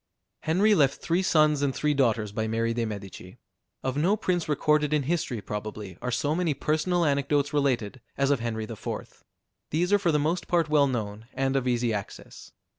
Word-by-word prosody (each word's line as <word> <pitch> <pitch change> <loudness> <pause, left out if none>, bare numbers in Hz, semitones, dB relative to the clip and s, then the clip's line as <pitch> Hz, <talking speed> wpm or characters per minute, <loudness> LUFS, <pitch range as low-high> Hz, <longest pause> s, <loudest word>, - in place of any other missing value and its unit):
Henry 195 +7 +3
left 140 -8 +3
three 170 +2 0
sons 155 -5 +3
and 140 -2 0
three 150 0 +1
daughters 115 -6 +1
by 110 +1 -2
Mary 115 +1 0
de 115 0 -1
Medici. 100 -3 -8 0.5
Of 130 +1 -2
no 185 +8 +2
prince 175 -5 -1
recorded 150 0 +2
in 150 -2 +2
history, 140 -7 -1
probably, 105 -2 -6
are 125 - -2
so 145 +4 0
many 165 -3 0
personal 160 +5 +1
anecdotes 145 0 +1
related, 130 -5 0 0.2
as 140 0 +2
of 140 - +2
Henry 115 -1 -3
IV. 110 0 -7 0.5
These 175 +5 0
are 205 - +5
for 175 -4 +2
the 150 - +2
most 160 +4 -1
part 170 -3 +1
well 145 -2 +4
known, 110 -3 -4
and 135 0 0
of 130 -2 0
easy 120 -2 +1
access. 100 -2 -7
140 Hz, 190 wpm, -27 LUFS, 115-155 Hz, 0.5 s, are